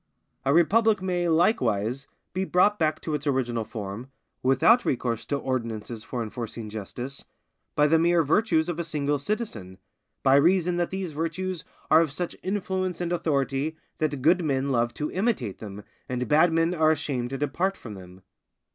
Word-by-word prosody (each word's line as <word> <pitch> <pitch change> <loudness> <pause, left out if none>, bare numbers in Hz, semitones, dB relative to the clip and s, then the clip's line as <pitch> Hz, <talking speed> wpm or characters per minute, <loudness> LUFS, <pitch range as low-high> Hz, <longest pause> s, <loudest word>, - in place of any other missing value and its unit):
A 135 - +3
republic 210 +7 +4
may, 180 -2 -1
likewise, 135 - +1 0.3
be 185 +1 -1
brought 195 +3 +3
back 155 -1 +1
to 155 - -3
its 150 0 -2
original 120 -4 0
form, 110 +2 -7 0.3
without 135 - +4
recourse 120 -3 -1
to 145 - 0
ordinances 115 -4 -3
for 120 -1 -3
enforcing 115 0 -6
justice, 120 +6 -6 0.5
by 150 - +4
the 160 +2 +4
mere 170 0 +4
virtues 160 0 +2
of 175 -1 -3
a - - 0
single 145 -3 -1
citizen, 135 - -4 0.5
by 135 +1 +6
reason 175 +3 +3
that 175 -1 0
these 190 -3 -4
virtues 165 +3 -3 0.3
are 160 +1 +8
of 160 -4 0
such 175 +4 -4
influence 185 -1 -2
and 175 0 -1
authority 145 -1 0 0.2
that 145 -4 -1
good 175 +4 +4
men 140 -2 0
love 120 -1 +1
to 150 - -3
imitate 185 - -1
them, 105 -1 -8 0.3
and 125 0 -2
bad 155 +3 +5
men 165 +1 +2
are 155 -2 +3
ashamed 140 -5 -1
to 135 - -4
depart 170 +8 -1
from 110 - -9
them. 90 -1 -12
150 Hz, 170 wpm, -26 LUFS, 125-175 Hz, 0.5 s, are